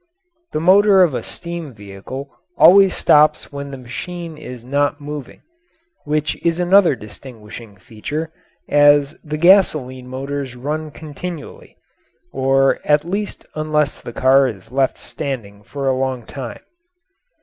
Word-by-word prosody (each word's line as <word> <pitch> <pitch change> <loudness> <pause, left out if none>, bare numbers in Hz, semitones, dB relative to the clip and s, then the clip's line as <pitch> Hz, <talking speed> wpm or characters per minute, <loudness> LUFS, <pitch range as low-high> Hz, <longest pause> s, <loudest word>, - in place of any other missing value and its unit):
The - - -1
motor 190 +3 +6
of 165 -6 +1
a - - -2
steam 170 -6 -7
vehicle 105 +7 -9 0.3
always 195 0 +7
stops 150 0 +3
when 140 0 -6
the 135 - -7
machine 165 +7 -7
is 125 -5 -10
not 145 +2 0
moving, 145 -2 -8 0.6
which 150 0 -2
is 170 0 +1
another 180 -2 +4
distinguishing 105 -1 -12
feature, 130 - -6 0.4
as 145 0 +4
the 150 -1 -4
gasoline 155 -8 +3
motors 135 0 -5
run 150 +5 -4
continually, 155 +1 -9 0.6
or 135 +1 +2
at 150 +1 +2
least 200 +4 -4
unless 155 -1 -1
the - - -8
car 135 +3 +4
is 105 -3 -8
left 135 0 +1
standing 105 -7 -6
for 135 +6 -5
a 130 - +2
long 130 -2 -2
time. 130 -4 -8
145 Hz, 130 wpm, -19 LUFS, 130-155 Hz, 0.6 s, always